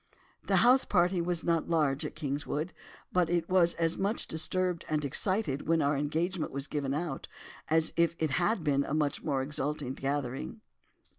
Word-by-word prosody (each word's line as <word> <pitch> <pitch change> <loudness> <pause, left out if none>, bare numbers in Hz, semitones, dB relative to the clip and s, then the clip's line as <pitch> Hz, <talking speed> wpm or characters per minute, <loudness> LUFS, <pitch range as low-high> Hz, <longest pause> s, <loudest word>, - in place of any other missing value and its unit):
"The - - +1
house 255 +2 +6
party 180 -1 +2
was 170 -1 0
not 165 -1 0
large 150 -3 +1
at - - -11
Kingswood, 150 +2 -3 0.4
but 180 -2 +2
it 170 -1 0
was 180 -2 +3
as 165 0 0
much 200 +3 0
disturbed 180 +2 -1
and 150 -1 0
excited 150 - 0
when 165 0 +3
our 145 -1 +2
engagement 160 +5 -1
was 140 0 -3
given 140 -1 -2
out, 170 +2 -4 0.4
as 160 0 +3
if 170 -1 +2
it 160 -2 -1
had 175 +5 +1
been 140 -2 +2
a 140 - -3
much 150 -2 0
more 135 -3 0
exalted 145 -2 -3
gathering. 140 - -3
160 Hz, 170 wpm, -30 LUFS, 145-175 Hz, 0.4 s, house